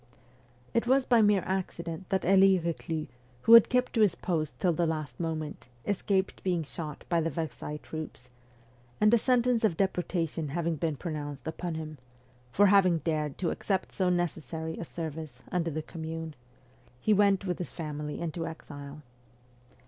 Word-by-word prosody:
It 230 +1 +1
was 265 +1 +4
by 240 -3 +5
mere 205 -3 +4
accident 175 -2 -3
that 190 -2 0
Elie 195 +1 +6
Reclus, 165 -2 -3 0.4
who 230 - +6
had 230 -2 +10
kept 250 0 +1
to 225 - +2
his 200 -5 +4
post 155 -4 -2
till 180 -3 +2
the 170 +1 +1
last 155 -6 -3
moment, 155 -4 -4 0.2
escaped 195 -1 0
being 180 -3 0
shot 150 0 -7
by 170 -1 +2
the 165 - 0
Versailles 155 -1 -4
troops; 155 -5 -8 0.7
and 210 +2 +5
a 235 - +6
sentence 245 -1 +2
of 175 -7 +2
deportation 170 -4 -1
having 165 +3 -1
been 160 0 -1
pronounced 145 -3 -5
upon 165 +1 -3
him 155 -2 -6 0.5
for 205 +10 +5
having 190 -3 +5
dared 155 -2 -2
to 175 - 0
accept 190 -2 -1
so 185 -2 +1
necessary 160 -2 -2
a - - -3
service 155 -6 -6
under 170 -2 0
the 155 0 -3
Commune 160 0 -6 0.7
he 215 - +3
went 200 -1 +3
with 180 -2 -2
his 180 - -4
family 150 -2 -5
into 165 0 -3
exile. 145 -2 -9
165 Hz, 165 wpm, -29 LUFS, 155-190 Hz, 0.7 s, had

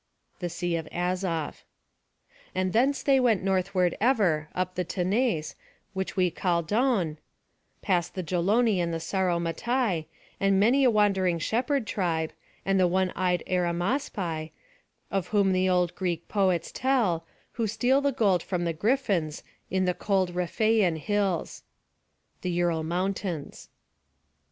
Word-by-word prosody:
[B] 175 -1 -2 1.8
And 185 0 0
thence 265 +5 +2
they 275 -1 +4
went 230 -7 +2
northward 185 -2 +1
ever, 185 - +2
up 185 0 -1
the 180 - -1
Tanais, 185 -1 0 0.4
which 190 +1 -4
we 180 -2 +3
call 170 -1 0
Don, 200 - +1 0.6
past 175 -4 0
the 185 - -3
Geloni 195 +5 +2
and 170 -1 0
Sauromatai, 175 +3 0 0.3
and 195 -1 +3
many 245 +7 +4
a 255 - +6
wandering 195 -5 +2
shepherd 245 - 0
tribe, 165 -6 -1 0.3
and 195 0 +2
the 185 - +5
one 185 +1 +1
eyed 180 -2 0
Arimaspi, 175 - -1 0.6
of 195 -3 -1
whom 200 -2 +2 0.2
old 180 -1 +2
Greek 175 -3 -3
poets 190 -5 +1
tell, 220 -11 +1 0.2
who 230 -2 -1
steal 245 +6 +2
the 280 0 +2
gold 200 -9 +2
from 180 -1 -2
the 165 - 0
Griffins, 195 - 0 0.3
in 185 0 +1
the 180 - +1
cold 190 -2 0
Rhiphaian[C] 180 +1 +1
hills. 200 0 -1
185 Hz, 115 wpm, -27 LUFS, 175-215 Hz, 1.8 s, a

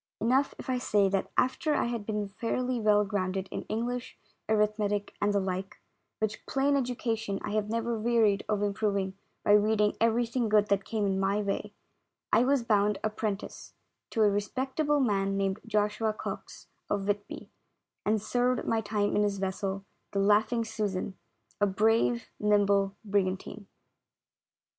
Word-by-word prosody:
Enough 260 +5 +2
if - - -9
I 255 -1 0
say 205 -5 +2
that 195 0 -1
after 295 +4 +2
I - - +1
had 235 -3 -3
been 210 -2 -1
fairly 240 +5 -2
well 210 -1 +4
grounded 190 -1 -2
in - - -3
English, 240 +3 -3 0.3
arithmetic 210 -1 +1
and 205 - +3
the 200 - +2
like, 190 0 -4 0.4
which 215 -1 -2
plain 275 +1 +2
education 230 -5 -1
I - - -3
have 210 0 0
never 230 0 -1
wearied 220 -3 +3
of 205 -1 +1
improving 200 -2 0 0.3
by - - +4
reading 210 0 +4
everything 230 +1 +2
good 210 -1 +4
that 200 -1 +1
came 215 -2 -1
in 190 -1 0
my 195 +2 +1
way, 200 +1 -3 0.6
I 235 - +6
was 275 -2 +2
bound 210 -2 +2
apprentice 215 -1 -4 0.3
to 225 - +2
a 210 - +6
respect 255 +8 -3
able 295 -2 +3
man 195 -5 +1
named 195 0 0
Joshua 215 0 +1
Cox, - - -7 0.2
of 200 -1 -1
Whitby, 205 0 -3 0.5
and 215 +1 +2
served 245 +3 0
my 225 -1 +1
time 205 -1 0
in 210 - +3
his 205 -1 +1
vessel, 195 0 -3 0.3
the 200 - +1
Laughing 210 +4 +3
Susan 205 -3 -3 0.2
— - - -37
a 205 - +5
brave, 225 +4 +2
nimble 200 -1 +3
brigantine. 195 0 -1
210 Hz, 155 wpm, -29 LUFS, 200-230 Hz, 0.6 s, I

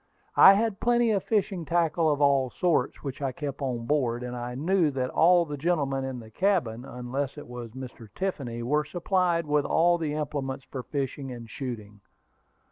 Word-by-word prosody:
I 195 - +9
had 215 -1 0
plenty 240 -1 +3
of 200 -2 +1
fishing 200 -5 0
tackle 165 0 +1
of 145 -1 0
all 140 -2 +3
sorts 170 +6 0
which 140 -1 -5
I 135 -2 -1
kept 140 +2 -6
on 125 -4 -2
board; 125 -4 0
and 125 0 -5
I 120 0 -5
knew 165 +4 +2
that 130 -2 -2
all 175 +1 +5
the 145 -2 -5
gentlemen 140 -4 0
in 130 -1 -4
the 110 -1 -12
cabin, 130 - 0
unless 130 +3 -4
it 150 - -9
was 120 -2 -8
Mr. 125 -3 -9
Tiffany, 135 -12 -3
were 150 +5 +1
supplied 175 +1 0
with 150 -1 +2
all 175 +3 +3
the 150 -2 -2
implements 140 -3 -3
for 130 - -6
fishing 135 0 -4
and 120 -2 -8
shooting. 110 -4 -7
140 Hz, 185 wpm, -27 LUFS, 125-170 Hz, -, I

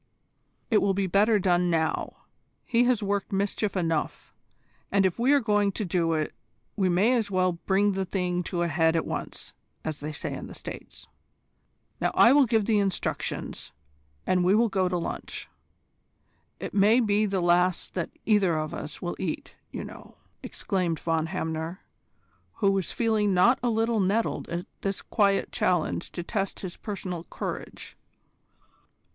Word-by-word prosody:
"It 215 - +5
will 195 -1 +2
be 195 0 +1
better 205 +4 +3
done 180 -2 +2
now. 160 -2 -1 0.4
He 245 0 +3
has 245 -4 +2
worked 200 0 -1
mischief 200 +1 0
enough, 165 -4 -2 0.6
and 195 -1 +3
if 185 +2 0
we 250 +4 +3
are 290 - +6
going 205 -4 +2
to 210 - -3
do 170 -2 +1
it 155 -1 -1 0.4
we 190 -3 +1
may 195 +8 +3
as 230 -5 +1
well 185 -1 +2 0.2
bring 200 +1 +3
the 195 0 -1
thing 180 -1 -1
to 175 -1 -1
a - - +1
head 160 +1 +2
at 165 - +1
once, - - -5 0.3
as 155 -2 -3
they 150 +2 -5
say 150 - -4
in - - -6
the - - -10
States. - - -9 0.9
Now - - +1
I 235 - +7
will 285 -2 +5
give 220 -3 +2
the 215 -1 +3
instructions, 195 - -3 0.5
and 180 -1 +2
we 185 +3 +4
will 230 +1 +3
go 190 -2 +1
to 180 - 0
lunch. 170 - -5 1.1
It - - -6
may 210 +4 +5
be 215 -2 +2
the 195 -1 0
last 175 0 +2
that 170 -3 -2 0.2
either 195 -7 +3
of 155 0 -3
us 150 - -7
will 175 - -2
eat, 170 -4 -4 0.2
you - - -5
know." - - -11
"Poof!" - - -37 0.2
exclaimed 180 -6 -2
Von 165 -1 0
Hamner, 160 0 -4 0.7
who 200 -3 +2
was 195 -3 -1
feeling 215 -4 +1
not 235 +8 +5
a 245 - +1
little 225 0 +1
nettled 205 +4 0
at 175 +2 -3 0.2
this 195 -1 -3
quiet 200 -3 +1
challenge 175 -1 0
to 175 - -4
test 195 +1 -3
his 185 -2 -6
personal 185 -5 -5
courage. - - -6
190 Hz, 170 wpm, -27 LUFS, 175-210 Hz, 1.1 s, I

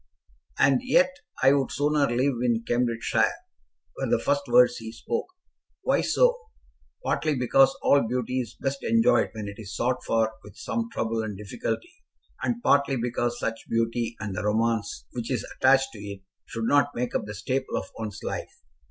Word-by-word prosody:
"And 135 - +4
yet 265 +2 +3 0.3
I 135 - +7
would 135 -2 +1
sooner 145 0 +2
live 130 +4 +1
in 120 -2 +1
Cambridgeshire," 120 -1 +1 0.6
were - - -3
the - - +4
first 145 0 +1
words 120 0 +5
he 110 -1 -7
spoke. 115 - -3 0.6
"Why - - +2
so?" - - +3 0.7
"Partly 155 -2 +1
because 135 +2 +4
all 140 -5 +4
beauty 125 +1 -1
is 115 -3 -5
best 135 0 -3
enjoyed 230 +2 +3
when 110 -2 -5
it 100 +1 -8
is 105 -1 -7
sought 125 +1 0
for 110 -1 +1
with 105 - -13
some 235 -1 -3
trouble 115 - -1
and 105 -3 -5
difficulty, 125 - -5 0.4
and 240 0 -2
partly 140 -1 +3
because 120 0 -1
such 115 -1 -4
beauty, 115 0 0
and 105 -3 -4
the - - -2
romance 110 0 0
which 120 -2 -5
is 130 - -1
attached 135 0 +4
to 110 - -10
it, 100 -1 -8 0.2
should 115 -1 -4
not 145 +3 +3
make 125 0 -2
up - - -1
the 105 0 -7
staple 130 +6 -2
of - - -3
one's 105 -2 -5
life. - - -4
120 Hz, 175 wpm, -26 LUFS, 115-140 Hz, 0.7 s, I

